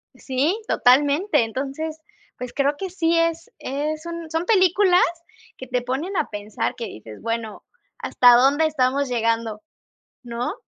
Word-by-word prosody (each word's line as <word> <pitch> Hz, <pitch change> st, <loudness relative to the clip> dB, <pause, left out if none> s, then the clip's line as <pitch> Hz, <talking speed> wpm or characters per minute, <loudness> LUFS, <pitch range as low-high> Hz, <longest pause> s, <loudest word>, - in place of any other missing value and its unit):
Sí, 285 Hz, -, -1 dB
totalmente. 290 Hz, -, +3 dB
Entonces, 280 Hz, +7 st, -4 dB, 0.4 s
pues, 250 Hz, -1 st, -7 dB
creo 285 Hz, +1 st, +1 dB
que 385 Hz, +2 st, -5 dB
sí 335 Hz, -2 st, +1 dB
es 330 Hz, +5 st, 0 dB
es 305 Hz, +4 st, -3 dB
un 335 Hz, -1 st, -6 dB
son 325 Hz, +2 st, -2 dB
películas 370 Hz, -2 st, +4 dB, 0.5 s
que 260 Hz, -, -9 dB
te 250 Hz, 0 st, -1 dB
ponen 270 Hz, +11 st, -3 dB
a -, -, 0 dB
pensar 210 Hz, 0 st, -4 dB
que 235 Hz, -, -5 dB
dices: 110 Hz, 0 st, -11 dB
"Bueno, 230 Hz, -2 st, -4 dB, 0.4 s
¿hasta 245 Hz, -1 st, +5 dB
dónde 275 Hz, +5 st, +4 dB
estamos 280 Hz, -2 st, 0 dB
llegando, 230 Hz, -2 st, -1 dB, 0.6 s
no?" 240 Hz, +4 st, -3 dB
280 Hz, 140 wpm, -22 LUFS, 245-330 Hz, 0.6 s, hasta